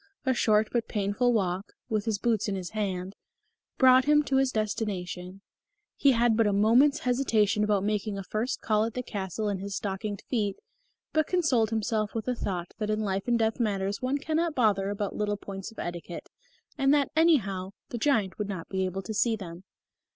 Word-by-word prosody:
A 260 - +3
short 215 -3 +3
but 235 -2 0
painful 210 +4 +1
walk, 195 -3 -1
with 215 -1 -1
his 220 -3 0
boots 220 0 0
in 200 - -1
his 180 -2 -5
hand, 195 -3 -3 0.6
brought 255 -1 +6
him 300 0 +4
to 270 -2 +1
his 265 -1 +2
destination. 195 -4 -3 0.5
He 275 -2 +4
had 235 -1 +2
a 215 -2 +4
moment's 235 +8 +4
hesitation 230 -5 +2
about 205 -2 +1
making 210 0 -1
a 195 - -4
first 225 +7 -2
call 215 -1 +2
at 225 - -5
the 250 - -2
castle 205 -1 -4
in 200 -2 -1
his 200 +1 -5
stockinged 200 0 -4
feet, 210 -6 -1 0.6
but 310 -1 +2
consoled 275 - +2
himself 220 -1 -1
with 220 -1 -2
the 250 - 0
thought 180 -7 -4
that 210 -1 -2
in 215 0 0
life 195 0 -2
and 240 -1 +3
death 225 0 0
matters 200 -3 -1
one 260 +2 0
cannot 315 +2 -1
bother 200 -5 +2
about 205 0 -3
little 205 -1 -1
points 195 -1 -7
of 225 - -19
etiquette, 175 0 -6 0.5
and 270 0 +4
that, 285 -2 +1
anyhow, 210 - +2 0.2
the 240 - -4
giant 220 -9 +1
would 205 -1 -2
not 185 -5 -5
be 190 -1 0
able 190 +1 -4
to 220 - -5
see 225 +2 +2
them. 180 -3 -9
215 Hz, 195 wpm, -28 LUFS, 195-240 Hz, 0.6 s, brought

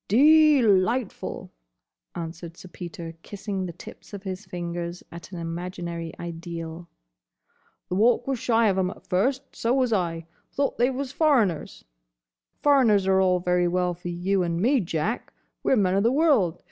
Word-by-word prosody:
"De 300 +4 +6
lightful!" 210 +3 0 0.6
answered 170 0 -7
Sir - - -11
Peter, 170 -2 -8
kissing 195 -1 -5
the - - -5
tips 175 - -13
of 200 - -9
his 190 +1 -5
fingers 175 0 -5
at 170 +2 -10
an 180 - -7
imaginary 170 0 -5
ideal. 170 0 -7 1.0
"The - - -4
Walk 230 +5 +3
was 270 -3 -2
shy 230 -2 +3
of 190 -1 +1
'em 185 -1 +1
at 195 - -11
first. 260 +9 -1
So 235 +3 +1
was 255 -4 +2
I. 170 -4 -1 0.3
Thought 280 -3 -1
they 245 +2 +4
was 265 0 -4
foreigners. 260 - +1 0.8
Foreigners 245 -9 +4
are 190 0 +3
all 180 -1 +2
very 180 0 +2
well 180 0 0
for 175 +1 -9
you 185 +3 0
and 170 -1 -1
me, 255 +8 +3
Jack. 180 +4 -2 0.3
We - - 0
're - - +6
men 185 -3 +2
o' 195 - +2
the 230 +3 +3
world. 265 - +3
185 Hz, 165 wpm, -25 LUFS, 175-235 Hz, 1.0 s, De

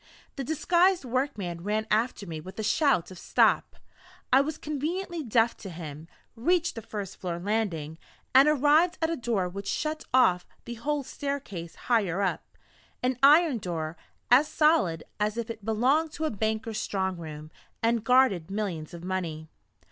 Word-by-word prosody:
The 275 - -4
disguised 345 +4 +2
workman 230 -9 -2
ran 215 +2 -1
after 220 0 +1
me 160 -3 -6
with 185 +4 -11
a 220 - -3
shout 220 - +2
of 185 - -10
"Stop!" - - +2 0.6
I 265 - +7
was 305 +2 -3
conveniently 330 +4 -3
deaf 230 -3 +2
to 195 - -8
him 160 -2 -8 0.3
reached 340 +8 +1
the 225 - -7
first 205 -3 -6
floor 175 -2 -4
landing 175 -6 -2 0.3
and 270 +3 +7
arrived 300 +4 +4
at 320 - +1
a - - 0
door 230 - -1
which 195 +2 -7
shut 310 0 -2
off 185 -9 +4 0.2
the 235 - -5
whole 285 +5 -2
staircase 250 - -5
higher 200 -7 0
up; 190 - -1 0.6
an 250 -1 0
iron 295 -2 +6
door, 165 -4 -4 0.4
as 270 +5 +6
solid 300 - +2 0.2
as 210 +1 0
if 235 -1 -3
it 225 -2 -10
belonged 260 +9 +2
to 315 - -3
a 310 - 0
banker's 220 +1 -2
strong 190 -2 -1
room, 155 -2 -9 0.3
and 230 -1 +2
guarded 240 -9 +3
millions 185 -6 -4
of 170 - -10
money. 170 -4 -4
225 Hz, 165 wpm, -27 LUFS, 180-280 Hz, 0.6 s, I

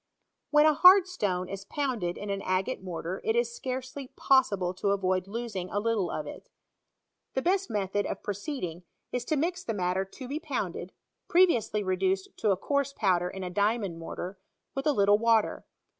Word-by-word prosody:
When 300 0 +5
a 310 - +6
hard 365 +4 +8
stone 195 - -2
is 195 +1 -6
pounded 240 - -2
in 205 -1 -4
an 195 0 -2
agate 185 +7 -1
mortar 180 0 -5
it 445 0 +1
is 475 0 +1
scarcely 260 - -5
possible 200 -10 +3
to 195 +2 -1
avoid 185 -2 +1
losing 210 -4 -4
a 205 - -1
little 210 -4 0
of 150 - -3
it. - - -10 0.9
The 265 - 0
best 385 +2 +1
method 205 -1 -1
of - - -5
proceeding; 200 - -4 0.3
is 245 -1 -2
to 310 - 0
mix 355 +5 -1
the 225 - -3
matter 185 0 0
to 250 +7 -10
be 290 +4 -3
pounded 205 - -4 0.4
(previously 335 - +3
reduced 190 0 0
to 215 - +1
a 195 - +3
coarse 280 +6 -1
pow 190 -7 +2
der 180 +1 -3
in 190 0 -6
a 180 - -4
diamond 205 -3 0
mortar) 180 +3 -6 0.3
with 270 +2 -2
a - - +5
little 205 -4 +4
water. 225 -1 +2
205 Hz, 185 wpm, -28 LUFS, 185-270 Hz, 0.9 s, hard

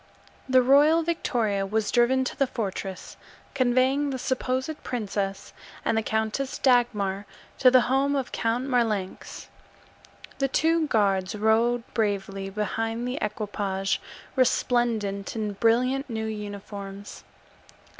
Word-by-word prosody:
The 255 -1 +5
royal 295 +5 +5
victoria 235 -11 0
was 210 +2 -1
driven 255 +2 +3
to 255 - -4
the 275 - +1
fortress, 195 -5 -5 0.4
conveying 260 +2 +2
the 265 - -3
supposed 260 +3 -2
princess 200 -4 -3 0.3
and - - +1
the 220 - +2
Countess 220 +5 -2
Dagmar 210 -6 +1 0.3
to 255 - +7
the 255 0 +6
home 270 +3 +1
of 270 -2 -2
Count 235 +2 -1
Marlanx. 225 -7 -2 0.9
The 275 - +2
two 320 +3 +2
guards 195 -5 +1
rode 225 +3 +2
bravely 195 -3 -1
behind 225 +3 -2
the 255 +3 -3
equipage, 200 -2 -2 0.3
resplendent 235 -6 +1
in 215 -2 -2
brilliant 250 +6 +1
new 220 -1 -3
uniforms. 205 -1 -7
225 Hz, 115 wpm, -26 LUFS, 205-260 Hz, 0.9 s, to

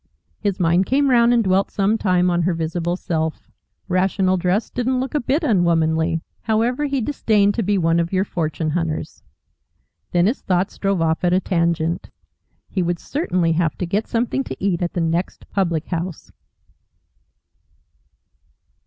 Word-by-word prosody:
His 200 -2 -1
mind 175 +2 +2
came 275 +1 +2
round 235 -1 +5
and 235 -1 +3
dwelt 190 0 +2
some 200 +2 +1
time 180 -4 +2
on 175 0 +1
her 170 0 +1
visible 165 +2 -2
self. 160 -3 -3 0.4
Rational 185 0 +1
dress 185 +4 0
didn't 250 +1 0
look 265 +3 -3
a 300 - +2
bit 285 +6 0
unwomanly. 165 - +2 0.2
However, 235 +6 0
he 275 -2 -1
disdained 215 -6 +2
to 230 - -1
be 205 0 +1
one 165 -1 +2
of 170 0 -1
your 190 0 +2
fortune 160 -3 -2
hunters. 165 -1 -3 0.9
Then 175 0 +3
his 230 +7 0
thoughts 185 +1 -1
drove 195 -4 +1
off 160 +1 0
at 175 0 +3
a 185 - +4
tangent. 170 -3 -1 0.6
He 190 - -2
would 175 0 0
certainly 180 - -1
have 160 -2 0
to 180 - -2
get 200 +6 -1
something 240 +3 0
to - - -6
eat 185 -3 0
at 175 - -2
the 175 - -1
next 165 +2 -2
public 170 -5 0
house. 170 -1 -4
185 Hz, 160 wpm, -21 LUFS, 170-215 Hz, 0.9 s, round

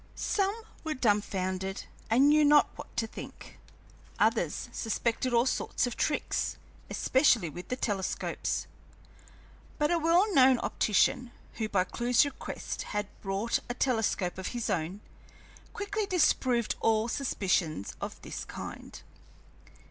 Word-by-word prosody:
Some 395 0 0 0.3
were 315 -1 -2
dumfounded 190 -4 0 0.3
and 255 +5 +5
knew 305 0 +5
not 295 0 +5
what - - -11
to 225 - +1
think, 225 - -10 0.6
others - - +1
suspected 235 +3 -1
all 235 0 +4
sorts 260 - 0
of 245 - -4
tricks, 295 - -1 0.3
especially 240 - +3
with 175 +4 -8
the 255 - -2
telescopes, 205 -6 -2 1.1
but 295 +1 +1
a 340 - +3
well 345 +6 +3
known 260 -3 +6
optician, 225 +4 +2 0.3
who 220 -2 -2
by 190 -3 +2
Clewe's 240 +6 +2
request 285 -2 -5 0.2
had 205 -1 -2
brought 200 +4 0
a 245 - -2
telescope 220 -8 0
of 190 - -4
his 235 - -1
own, 180 +4 -2 0.7
quickly 410 +1 -3
disproved 255 - +2
all 225 0 +2
suspicions 185 - -1
of - - -5
this - - -6
kind. - - -8
235 Hz, 125 wpm, -30 LUFS, 200-285 Hz, 1.1 s, known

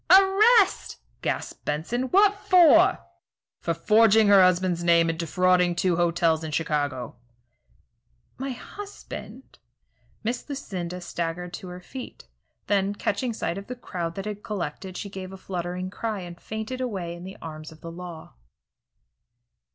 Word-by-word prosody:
"Arrest!" 390 +3 +5 0.2
gasped - - -3
Benson. 165 +13 -1
"What 395 +8 +5
for?" 360 -3 +5 0.5
"For 170 - -1
forging 215 +4 +5
her 200 -1 +8
husband's 180 -1 +3
name, 170 -1 +4
and 165 - -8
defrauding 180 +1 +2
two 180 0 +1
hotels 170 -2 +2
in 160 - -4
Chicago." 145 -6 -2 1.2
"My 270 +1 -3
husband 400 - -9 0.3
" - - -38
Miss 240 +6 -3
Lucinda 180 -10 -5
staggered 175 +1 -4
to 185 - -7
her 180 0 -8
feet, 255 +7 -9 0.4
then, 200 0 +1
catching 220 +5 -1
sight 195 -4 -3
of 200 - -11
the 250 - -5
crowd 175 -8 -5
that 195 - -5
had 210 -1 -5
collected, 185 -2 -5
she - - -5
gave 190 -1 -7
a 190 - -8
fluttering 180 0 -4
cry 215 -1 -3
and 175 -1 -9
fainted 220 +4 -5
away 190 -9 -3
in 175 0 -9
the 190 +1 -9
arms 155 -1 -8
of 160 - -16
the 165 - -7
law. 170 -2 -9
185 Hz, 145 wpm, -26 LUFS, 170-225 Hz, 1.2 s, her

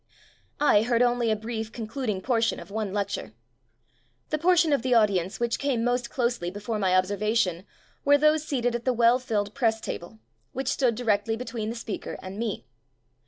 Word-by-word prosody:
I 285 -8 +5
heard 235 +1 +2
only 240 -1 +2
a 215 - +3
brief, 220 0 -5
concluding 225 -3 -3
portion 230 0 +1
of 170 - -11
one 215 -2 -2
lec 200 0 -2
ture. 110 - -5 1.0
The 305 - 0
portion 335 -2 +4
of 280 - +2
the 250 0 +2
audience 200 -4 +2
which 235 -1 0
came 265 -5 0
most 245 0 0
closely 235 -9 -1
before 210 +3 -4
my 185 -2 +2
ob 185 - +5
servation 205 -2 0 0.4
were 285 0 +5
those 305 +1 +3
seated 245 -5 -1
at 240 0 -3
the 255 - +2
well 235 +1 +4
filled 210 -5 -2
press 225 -4 +1
table, 175 0 -6 0.4
which 265 +1 -2
stood 250 -4 +1
di 245 - -5
rectly 220 0 +1
between 230 -2 -4
the 230 - -4
speaker 230 -3 -5
and 190 +2 -7
me. 225 -3 -3
230 Hz, 190 wpm, -26 LUFS, 210-245 Hz, 1.0 s, I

